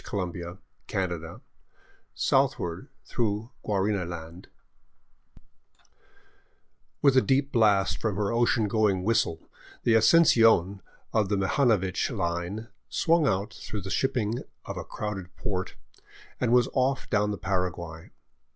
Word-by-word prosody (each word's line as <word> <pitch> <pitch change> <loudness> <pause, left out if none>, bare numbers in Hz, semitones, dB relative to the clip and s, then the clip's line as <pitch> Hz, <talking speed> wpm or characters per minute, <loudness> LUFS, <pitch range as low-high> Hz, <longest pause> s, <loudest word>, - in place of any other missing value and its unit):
f - - -11 0.8
CHAPTER 90 -3 -2
XXII 80 +1 -10 0.7
SOUTHWARD 85 -1 0 0.2
THROUGH 110 +1 -2
GUARANI 100 -1 0
LAND 85 +1 -8 2.6
WITH 140 -2 +5
a 130 - +6
deep 135 +2 +1
blast 100 - +3
from 105 -3 -1
her 100 0 -1
ocean 115 -2 +2
going 100 -3 +1
whistle 100 -6 0 0.4
the 115 - +3
Asuncion 110 - +5 0.3
of 105 -3 +2
the 100 - +1
Mihanovich 95 -2 +1
Line 95 0 -3 0.2
swung 165 -2 +2
out 100 -2 -1
through 105 - -6
the 95 +1 -6
shipping 120 -4 0 0.3
of - - -5
a - - -5
crowded 95 -4 -6
port 95 -5 -4 0.6
and 120 -2 +1
was 125 0 +5
off 130 0 0
down 105 -1 +2
the 105 - -3
Paraguay. 85 -3 -3
105 Hz, 120 wpm, -27 LUFS, 90-115 Hz, 2.6 s, a